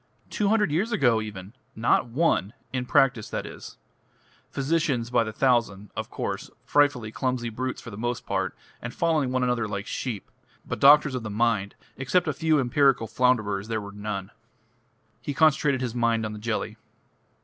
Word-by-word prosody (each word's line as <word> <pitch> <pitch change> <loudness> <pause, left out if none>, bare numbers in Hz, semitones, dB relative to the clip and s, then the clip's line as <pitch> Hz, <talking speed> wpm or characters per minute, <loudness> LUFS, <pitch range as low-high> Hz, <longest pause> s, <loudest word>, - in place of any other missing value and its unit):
Two 210 - 0
hundred 210 -6 +2
years 190 +10 0
ago 120 - +3
even 100 -1 -8 0.2
not 115 +2 +2
one! 120 - +1 0.2
In 125 -1 -2
practice, 125 -4 +3
that - - -4
is. - - -10 0.7
Physicians 135 -5 0
by 115 - +3
the 110 - -5
thousand, 110 -5 +1
of - - -4
course - - -4 0.2
frightfully 145 -7 +2
clumsy 125 -1 -2
brutes 130 +3 -4
for 115 - -9
the 105 - -9
most 120 +1 -3
part, - - -2 0.3
and 120 +1 -6
following 155 -6 +1
one 130 0 +1
another 125 -2 0
like 100 -1 -4
sheep 120 -4 -5 0.3
but - - -4
doctors 145 0 +7
of 125 - -2
the 110 - -6
mind, 105 -2 0 0.2
except 135 +8 +1
a 155 - 0
few 155 +1 +2
empirical 135 -1 +3
flounderers 110 -4 +1
there 110 -1 -1
were 100 -1 -8
none." 100 -1 -5 0.9
He 140 +3 -4
concentrated 150 -4 +3
his 125 -3 -2
mind 115 -2 +1
on 105 - -4
the 105 - -7
jelly. 110 +1 -3
120 Hz, 170 wpm, -26 LUFS, 110-140 Hz, 0.9 s, doctors